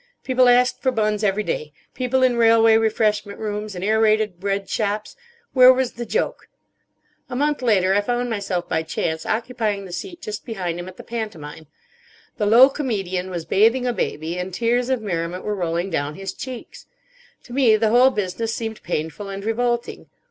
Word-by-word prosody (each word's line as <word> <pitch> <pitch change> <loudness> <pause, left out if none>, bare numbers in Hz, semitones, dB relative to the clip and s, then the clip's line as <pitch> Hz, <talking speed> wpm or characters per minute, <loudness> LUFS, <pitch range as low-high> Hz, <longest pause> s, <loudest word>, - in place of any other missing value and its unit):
People 255 -1 +3
asked 250 +1 +3
for 260 - +2
buns 215 -2 0
every 210 +1 +1
day—people 250 - -3
in 255 -1 +3
railway 225 -1 +5
refreshment 215 -2 +1
rooms, 210 -1 -4
in 180 - -5
aerated 215 -2 +2
bread 195 +1 -2
shops. 210 -1 -2 0.4
Where 255 -1 +8
was 260 -1 0
the 235 0 -7
joke? - - -2 0.8
A 245 - -5
month 295 +2 0
later 195 -6 +3
I 205 - +3
found 245 +3 -1
myself 200 -6 -3
by 160 - 0
chance 160 0 -3
occupying 220 -3 -2
the 185 - -10
seat 345 - -6
just 215 -10 -6
behind 180 -8 -4
him 175 - -6
at 185 - -11
the - - -10
pantomime. 165 -10 -6 0.7
The 210 - 0
low 240 +5 +8
comedian 195 -10 -3
was 170 -3 -5
bathing 225 +9 +3
a 245 - 0
baby, 165 -4 -3
and 180 +1 -4
tears 240 +6 0
of 255 -4 0
merriment 175 -2 -3
were 210 - -2
rolling 175 -1 -2
down 145 -1 -2
his 195 -1 -6
cheeks. 255 -2 -9 0.6
To 240 - -12
me 250 -5 +4
the 215 0 +2
whole 250 +3 +6
business 215 0 -3
seemed 225 -1 -5
painful 170 +4 -4
and 195 +1 -6
revolting. 240 +1 -1
215 Hz, 175 wpm, -22 LUFS, 185-240 Hz, 0.8 s, Where